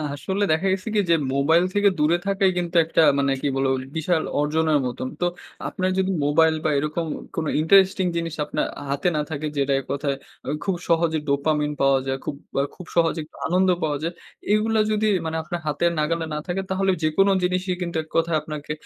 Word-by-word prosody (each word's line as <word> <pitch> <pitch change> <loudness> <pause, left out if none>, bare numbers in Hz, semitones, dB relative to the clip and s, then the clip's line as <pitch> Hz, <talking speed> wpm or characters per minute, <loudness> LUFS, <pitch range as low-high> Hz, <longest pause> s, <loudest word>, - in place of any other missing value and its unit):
আসলে 195 +7 -2
দেখা 160 +5 +1
গেছে 190 +2 -4
কি - - +4
যে, 165 - +6 0.2
মোবাইল 160 +5 +4
থেকে 205 0 +4
দূরে 160 +3 +3
থাকাই 195 -1 +3
কিন্তু 175 0 -3
একটা 165 - +2 0.2
মানে 140 0 +2
কি - - 0
বলবো? 135 0 +1 0.2
বিশাল 160 0 +1 0.2
অর্জনের 155 0 +2
মতন। 130 +1 -3
তো - - +3 0.4
আপনার 185 -1 -1
যদি 190 0 +1
মোবাইল 160 +2 +4
বা, 155 - +1
এরকম 155 +3 -2 0.3
কোন 160 - -1
ইন্টারেস্টিং 190 +3 +4
জিনিস 165 -1 -2
আপনার - - -1 0.2
আ - - -7
হাতে 140 +6 0
না - - +1
থাকে, 155 0 -3
যেটা 140 0 +1
এক 135 - -9
কথায় 140 -1 -1 0.3
আ - - -2
খুব 195 - 0
সহজে 165 -1 +2
dopamine 150 +1 +1
পাওয়া 135 -1 +4
যায়। 135 0 -1
খুব 145 - -3 0.3
আ - - +1
খুব 180 - -10
সহজে 165 -1 +2 0.3
আনন্দ 185 +2 +2
পাওয়া 150 -2 0
যায়। 170 +2 -2 0.4
এগুলা 220 +1 +2
যদি 215 0 +1 0.2
মানে 160 0 -2
আপনার 175 +2 -4
হাতের 170 +4 +1
নাগালে 165 +2 0
না 150 - -2
থাকে, 180 +2 -1
তাহলে 190 0 +1
যেকোনো 195 +6 +3
জিনিসই 185 +1 0
কিন্তু 170 -1 -4
এক 155 - -22
কথায় 165 -1 +2
আপনাকে 150 -1 -7
160 Hz, 195 wpm, -23 LUFS, 150-185 Hz, 0.4 s, যে